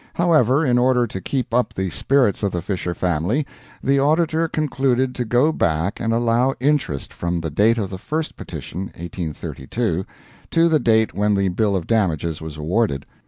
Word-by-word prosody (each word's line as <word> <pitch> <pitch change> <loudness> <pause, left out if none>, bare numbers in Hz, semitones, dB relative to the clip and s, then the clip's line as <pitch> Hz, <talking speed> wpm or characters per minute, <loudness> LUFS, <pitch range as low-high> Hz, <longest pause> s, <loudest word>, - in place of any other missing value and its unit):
However, 155 -4 +3
in 125 -2 +3
order 125 -1 +3
to 95 -4 -6
keep 125 +4 -3
up 125 +1 +1
the 95 -1 -2
spirits 125 - +2
of 100 -2 0
the 85 -2 -3
Fisher 90 -2 -3
family, 90 - 0 0.4
the 140 +1 +3
Auditor 160 +3 +2
concluded 130 -4 0
to 125 - -3
go 125 +7 +3
back 85 - 0
and 115 -1 -1
allow 120 +3 +2
interest 130 - 0
from 85 0 -2
the 80 -2 -4
date 110 +9 +3
of 100 -4 -2
the 95 - -6
first 155 +8 -3
petition 95 +3 -6
(1832) 85 - -3 0.5
to 165 0 +4
the 155 -2 +3
date 110 -3 +2
when 105 0 +1
the 100 -1 +1
bill 100 +2 +1
of 90 -4 -2
damages 85 -8 0
was 80 -1 -7
awarded. 80 -2 0
110 Hz, 175 wpm, -21 LUFS, 90-130 Hz, 0.5 s, to